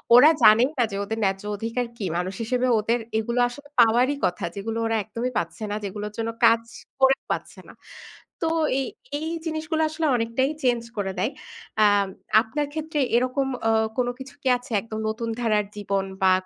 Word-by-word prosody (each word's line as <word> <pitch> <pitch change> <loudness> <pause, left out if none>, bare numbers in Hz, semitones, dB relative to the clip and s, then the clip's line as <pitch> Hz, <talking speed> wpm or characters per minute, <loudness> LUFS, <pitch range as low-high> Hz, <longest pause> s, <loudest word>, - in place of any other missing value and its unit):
ওরা 265 +5 +9
জানেই 225 +5 +7
না - - +5
যে, - - -4
ওদের 220 +2 -4
ন্যায্য 195 0 0
অধিকার 230 +4 -2
কি? 205 - -3
মানুষ 180 +2 -2
হিসেবে 250 +2 0
ওদের 230 +3 +1 0.2
এগুলো 235 +2 -1
আসলে 285 +3 -12
পাওয়ারই 240 +4 +5
কথা। 180 +2 -2
যেগুলো 225 +3 -4
ওরা 225 0 +1
একদমই 235 +4 -4
পাচ্ছে 170 +5 -3
না। - - -1
যেগুলোর 205 +1 -5
জন্য 230 0 -1 0.2
কাজ 230 0 +5 0.4
করে 265 0 +6 0.2
পাচ্ছে - - -4
না। - - -12 0.7
তো 330 - +1 0.7
এই 315 - -4 0.2
জিনিসগুলো 315 0 -2
আসলে 315 +1 -2
অনেকটাই 230 +4 0
চেঞ্জ 240 -2 +2 0.2
করে 195 -2 -1
দেয়। 240 - 0 0.5
এ্যাঁ 205 -2 +5 0.4
আপনার 285 +6 -3
ক্ষেত্রে 315 -1 -3 0.2
এরকম 255 +2 0 0.2
এ্যাঁ 220 0 +3
কোন 250 -1 +1
কিছু 270 +2 -10
কি - - -1
আছে? 245 0 -15
একদম 220 -1 -6
নতুন 230 +1 -3
ধারার 215 -3 +2
জীবন 195 -1 -1 0.2
বা 190 - +6
230 Hz, 175 wpm, -24 LUFS, 210-260 Hz, 0.7 s, ওরা